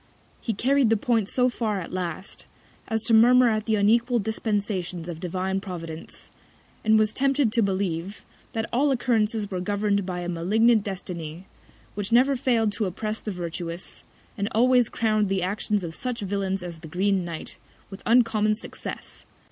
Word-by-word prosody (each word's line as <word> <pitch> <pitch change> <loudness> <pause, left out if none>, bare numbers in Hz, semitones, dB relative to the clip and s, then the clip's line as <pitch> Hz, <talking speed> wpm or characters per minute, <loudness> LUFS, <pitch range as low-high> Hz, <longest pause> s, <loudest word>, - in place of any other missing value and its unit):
He 225 - -2
carried 265 +2 +3
the 225 - +3
Point 225 -2 +1
so 250 -1 +2
far 220 -5 -1
at 180 - -7
last, 185 0 -5 0.4
as 225 -1 -1
to 230 0 +2
murmur 245 +2 +7
at 215 0 -1
the 220 - +3
unequal 230 +4 +3
Dispensations 200 -5 -2
of 170 -2 -6
Divine 185 +2 -2
Providence; 165 -4 -8 0.5
and 220 0 +5
was 215 0 +2
tempted 275 -3 +2
to 230 - +2
believe, 190 -1 -2 0.3
that 225 0 -2
all 280 +5 +3
Occurrences 225 -5 +1
were 185 - -2
govern'd 200 +1 0
by 180 -1 -4
a 175 - -4
malignant 210 +6 +3
Destiny, 180 -4 -6 0.5
which 205 0 -4
never 260 +4 +5
fail'd 235 -4 +1
to 215 - 0
oppress 215 +4 -3
the 210 - -5
Virtuous, 175 -1 -5 0.4
and 200 +1 0
always 245 +1 +4
crown'd 215 -3 +1
the 190 -2 0
Actions 205 +1 0
of 165 -2 -5
such 245 +3 -4
Villains 195 -1 -2
as 170 -2 -7
the 160 - -10
green 190 +3 +1
Knight, 170 -2 -6 0.3
with 195 - -9
uncommon 225 -3 +3
Success. 215 - -7
205 Hz, 165 wpm, -25 LUFS, 185-230 Hz, 0.5 s, murmur